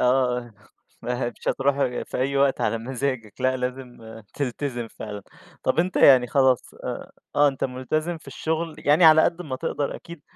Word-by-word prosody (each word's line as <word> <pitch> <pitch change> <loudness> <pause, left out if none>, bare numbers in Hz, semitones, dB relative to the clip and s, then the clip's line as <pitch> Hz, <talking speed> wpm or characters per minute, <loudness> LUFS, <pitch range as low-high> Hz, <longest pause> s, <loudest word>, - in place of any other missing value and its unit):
آه، 125 -2 +1 0.5
ما 125 +1 -2
هي 120 - -1
مش - - -4
هتروْح 135 +1 +1
غ 125 -3 -1
في - - -6
أي 135 +2 0
وقت 140 -1 +2
على 115 +1 0
مزاجك، 125 -3 -4
لأ 130 0 +2
لازم 125 0 -5 0.4
تلتزم 125 -3 -3
فعلًا 105 -2 -8 0.4
طب 155 - 0
أنت 180 +2 +1
يعني 130 -3 +7
خلاص 130 -1 +2
آآ - - -5 0.3
آه 145 0 +6
أنت 135 -2 -3
مُلتزم 155 +6 -2
في 155 - -21
الشغل، 160 0 -3
يعني 150 +4 +4
على 160 0 +8
قد 175 +1 0
ما 130 -5 -5
تقدر 140 +2 -2
أكيد، 170 -3 -12
135 Hz, 180 wpm, -24 LUFS, 125-145 Hz, 0.5 s, على